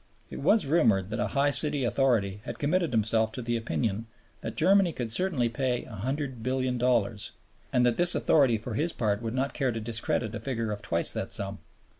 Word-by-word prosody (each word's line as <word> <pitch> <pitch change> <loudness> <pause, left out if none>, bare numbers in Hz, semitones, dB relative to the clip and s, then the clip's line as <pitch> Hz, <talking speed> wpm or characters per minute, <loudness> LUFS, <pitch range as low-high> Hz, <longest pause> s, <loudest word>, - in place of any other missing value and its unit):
It - - -6
was 215 -4 +3
rumored 110 - +2
that 110 - -3
a - - 0
high 145 +1 +3
city 145 -1 +2
authority 115 -6 +1
had - - -6
committed 170 +3 0
himself 110 -1 +1
to 125 - -4
the 120 0 -1
opinion 115 -1 -2 0.3
that - - -6
Germany 190 -3 +3
could 120 -5 -4
certainly 150 -4 0
pay 125 +1 -1
$100,000,000,000 125 -2 -1 0.4
and 125 -1 +3
that 120 -1 +2
this 175 0 +5
authority 135 -7 +3
for 115 +2 -6
his 160 +9 0
part 105 -2 -1
would 115 +1 -4
not 135 +2 -1
care 135 -4 0
to 115 - -4
discredit 115 0 -1
a - - -4
figure 115 -5 -3
of 105 - -4
twice 85 0 +2
that - - -4
sum. - - -4
120 Hz, 190 wpm, -28 LUFS, 110-140 Hz, 0.4 s, this